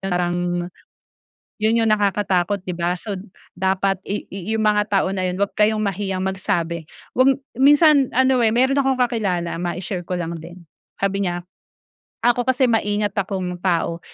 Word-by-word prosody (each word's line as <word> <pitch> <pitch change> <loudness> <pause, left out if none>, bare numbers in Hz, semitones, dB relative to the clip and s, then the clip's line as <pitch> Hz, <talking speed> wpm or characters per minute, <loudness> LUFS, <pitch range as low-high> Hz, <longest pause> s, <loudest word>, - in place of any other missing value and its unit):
parang 180 -2 -1 1.2
yun 220 +2 +2
yung 225 - +2
nakakatakot 200 -2 +1
di 185 - -6
ba. 175 0 -1
So 195 +2 -5 0.4
dapat 190 0 +1
i 205 - -4
i 195 +3 -4
yung 220 - 0
mga 210 -1 +2
tao 195 -2 +1
na 185 -1 -1
yun, 180 - -2
'wag 200 - +1
kayong 215 0 +3
mahiyang 195 -2 -2
magsabi, 170 -4 -2 0.3
'wag 265 +1 +6 0.2
minsan 290 0 +6
ano, 260 +1 +4
eh, 220 - +2
mayro'n 260 +3 +3
akong 270 -1 +2
kakilala, 190 -9 -1
mai-share 175 +1 -4
ko 185 - -3
lang 170 -1 -3
din 175 +2 -11 0.4
sabi 195 0 0
niya, 175 0 -2 0.8
"Ako 245 0 +3
kasi 260 0 +3
maingat 205 -2 0
akong 185 -2 -2
tao, 170 -2 0
195 Hz, 155 wpm, -21 LUFS, 180-220 Hz, 1.2 s, wag